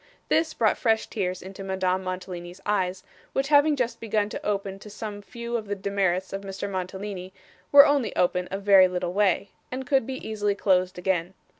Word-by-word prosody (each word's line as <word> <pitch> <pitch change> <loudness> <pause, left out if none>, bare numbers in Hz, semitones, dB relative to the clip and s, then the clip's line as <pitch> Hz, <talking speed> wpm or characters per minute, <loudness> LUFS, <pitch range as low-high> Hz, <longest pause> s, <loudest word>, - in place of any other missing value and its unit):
This 320 0 +2
brought 220 -2 +2
fresh 225 -2 +2
tears 185 -3 -3
into 195 +1 -8
Madame 190 -1 0
Mantalini's 180 -1 -6
eyes, 185 -3 0 0.3
which 270 +1 0
having 295 0 +5
just 240 -3 -2
begun 215 -2 0
to - - -6
open 200 -1 -2
to 210 - -11
some 205 0 -6
few 235 +3 -6
of 220 -3 -3
the 205 - -2
demerits 190 -2 -1
of 195 - -3
Mr. 195 0 -5
Mantalini, 190 0 -5 0.4
were 285 0 +10
only 285 -5 +1
open 180 0 +1
a 195 - -3
very 195 -2 +6
little 180 -1 -3
way, 200 -1 +2 0.2
and 260 +1 -4
could 265 -3 +2
be 265 -1 -5
easily 205 -2 0
closed 185 -2 +2
again. 180 0 -1
200 Hz, 185 wpm, -26 LUFS, 185-220 Hz, 0.4 s, were